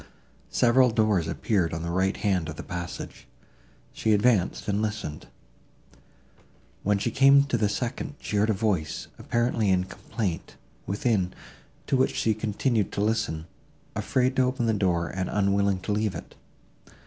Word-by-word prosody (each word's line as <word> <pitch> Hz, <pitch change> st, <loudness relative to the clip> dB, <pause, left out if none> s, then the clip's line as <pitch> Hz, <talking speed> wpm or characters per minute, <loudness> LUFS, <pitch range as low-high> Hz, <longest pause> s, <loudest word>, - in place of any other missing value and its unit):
Several 125 Hz, +1 st, +4 dB
doors 110 Hz, -7 st, +2 dB
appeared 90 Hz, -7 st, 0 dB
on 80 Hz, -, -4 dB
the 85 Hz, -, -3 dB
right 95 Hz, +2 st, +1 dB
hand 95 Hz, -6 st, 0 dB
of 80 Hz, -, -6 dB
the -, -, -7 dB
passage. 90 Hz, -1 st, -7 dB, 0.7 s
She 110 Hz, -, +1 dB
advanced, 105 Hz, -3 st, +2 dB
and 105 Hz, 0 st, 0 dB
listened. 105 Hz, -8 st, -4 dB, 1.5 s
When 105 Hz, 0 st, +2 dB
she 115 Hz, +4 st, -1 dB
came 140 Hz, +2 st, +6 dB
to 140 Hz, -3 st, -1 dB
the 105 Hz, -3 st, +2 dB
second, 120 Hz, +6 st, -3 dB
she 105 Hz, -, -3 dB
heard 105 Hz, +2 st, +3 dB
a -, -, +4 dB
voice, 95 Hz, -7 st, -1 dB
apparently 120 Hz, -3 st, 0 dB
in 90 Hz, -1 st, +3 dB
complaint, 95 Hz, -1 st, -5 dB, 0.3 s
within, 100 Hz, -3 st, 0 dB, 0.5 s
to 135 Hz, -, +1 dB
which 130 Hz, -, +1 dB
she 110 Hz, -, +2 dB
continued 110 Hz, 0 st, 0 dB
to -, -, -1 dB
listen, 105 Hz, -7 st, 0 dB, 0.5 s
afraid 130 Hz, 0 st, +1 dB
to -, -, +5 dB
open 125 Hz, -1 st, 0 dB
the 115 Hz, -, +2 dB
door, 90 Hz, -5 st, +1 dB
and 95 Hz, -1 st, -3 dB
unwilling 100 Hz, -1 st, +1 dB
to 105 Hz, -, -3 dB
leave 105 Hz, -2 st, 0 dB
it. -, -, -9 dB
105 Hz, 155 wpm, -26 LUFS, 95-115 Hz, 1.5 s, came